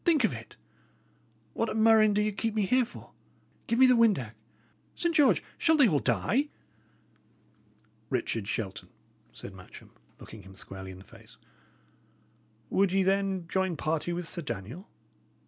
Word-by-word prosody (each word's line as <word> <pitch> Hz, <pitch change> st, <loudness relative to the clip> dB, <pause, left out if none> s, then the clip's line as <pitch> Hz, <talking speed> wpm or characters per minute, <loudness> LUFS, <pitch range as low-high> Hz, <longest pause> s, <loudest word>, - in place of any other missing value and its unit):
"Think 320 Hz, -7 st, +3 dB
of 220 Hz, -, +2 dB
it! -, -, -10 dB, 1.0 s
What 230 Hz, -, -1 dB
a -, -, -4 dB
murrain 220 Hz, -1 st, +5 dB
do 210 Hz, -, +2 dB
ye 215 Hz, -, 0 dB
keep 220 Hz, +2 st, -3 dB
me 210 Hz, -2 st, +2 dB
here 250 Hz, +5 st, +3 dB
for? 230 Hz, -, -13 dB, 0.6 s
Give 230 Hz, -, 0 dB
me 260 Hz, -, +7 dB
the 255 Hz, -, +6 dB
windac. 200 Hz, -, +2 dB, 0.6 s
Saint 340 Hz, -1 st, 0 dB
George! 295 Hz, -3 st, +4 dB, 0.2 s
shall 320 Hz, -1 st, +4 dB
they 280 Hz, -5 st, +6 dB
all 150 Hz, -8 st, +2 dB
die?" 135 Hz, -, 0 dB, 1.6 s
"Richard 110 Hz, -3 st, -2 dB
Shelton," 100 Hz, -3 st, -4 dB, 0.4 s
said 100 Hz, -, -9 dB
Matcham, 90 Hz, -1 st, -14 dB, 0.3 s
looking 110 Hz, -, -11 dB
him 95 Hz, 0 st, -14 dB
squarely 95 Hz, 0 st, -9 dB
in 95 Hz, -, -9 dB
the 95 Hz, -, -13 dB
face, -, -, -17 dB, 1.3 s
"would 195 Hz, -1 st, +3 dB
ye, 195 Hz, 0 st, +2 dB
then, 195 Hz, -2 st, 0 dB
join 190 Hz, -2 st, -1 dB
party 155 Hz, +3 st, -1 dB
with 175 Hz, 0 st, -3 dB
Sir 170 Hz, -, -4 dB
Daniel? 120 Hz, -, -7 dB
190 Hz, 155 wpm, -29 LUFS, -, 1.6 s, me